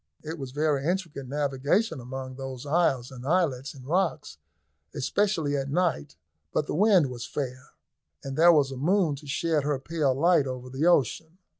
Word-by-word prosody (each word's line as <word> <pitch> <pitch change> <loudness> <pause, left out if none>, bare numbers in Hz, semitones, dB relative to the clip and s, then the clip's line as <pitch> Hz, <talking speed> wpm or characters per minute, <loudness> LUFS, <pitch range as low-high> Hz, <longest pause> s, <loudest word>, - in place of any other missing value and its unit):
It 160 +1 -6
was 135 -2 -5
very 145 0 0
intricate 165 -5 -2
navigation 145 - 0
among 130 +1 -6
those 135 0 -7
isles 140 -5 +1
and 125 -2 -10
islets 145 -4 0
and 130 -2 -12
rocks, 165 - -1 0.6
especially 165 -3 0
at 135 0 -2
night, 165 - 0 0.4
but 150 - 0
the - - -4
wind 185 -6 +4
was 120 -2 -6
fair, 130 -2 -5 0.5
and 135 -1 -5
there 170 +3 +7
was 145 -4 +3
a 135 - -6
moon 170 +1 +2
to 145 +1 -13
shed 155 +2 0
her 145 -1 0
pale 140 -1 0
light 165 -1 +3
over 125 -1 -6
the 140 +6 0
ocean. 160 - +1
145 Hz, 170 wpm, -27 LUFS, 130-165 Hz, 0.6 s, there